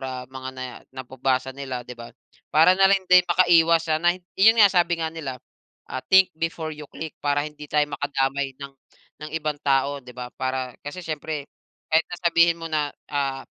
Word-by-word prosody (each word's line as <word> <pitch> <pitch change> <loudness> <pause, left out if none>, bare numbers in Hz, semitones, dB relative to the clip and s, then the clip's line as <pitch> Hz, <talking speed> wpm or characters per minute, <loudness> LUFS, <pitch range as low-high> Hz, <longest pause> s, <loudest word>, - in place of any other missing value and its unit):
ah, 130 -1 -5
mga 130 0 -7
nae 130 0 -5 0.3
nababasa 130 0 -2
nila, 130 -3 -6
'di 125 - -9
ba? 120 -1 -10 0.4
Para 160 +4 +5
na 195 +1 +4
rin 195 -1 +2
din 180 0 +7
makaiwas 170 -2 +4
sa 155 - +1
na 175 +1 +2 0.2
yun 220 +4 +5
nga 205 -3 +6
sabi 175 -2 +2
nga 160 -1 -3
nila, 145 -6 -6 0.6
ah, - - -3
"Think 190 -1 +5
before 165 -1 -3
you 150 -1 -10
click" 160 -1 -7
para 145 0 0
hindi 150 -1 -9
tayo 150 0 +2
makadamay 135 -1 -2
ng, 140 -1 -9 0.5
ng 155 - -7
ibang 150 -2 -3
tao, 140 0 +1
'di 125 -1 -14
ba? 125 0 -7
Para 130 -1 -2
kasi 165 +5 -8
siyempre 155 -1 -4 0.5
kahit 160 +1 +3
na 175 - -6
sabihin 170 0 +4
mo 165 - -9
na, 150 -2 +1 0.2
ah, 135 -2 -2
150 Hz, 190 wpm, -24 LUFS, 135-165 Hz, 0.6 s, din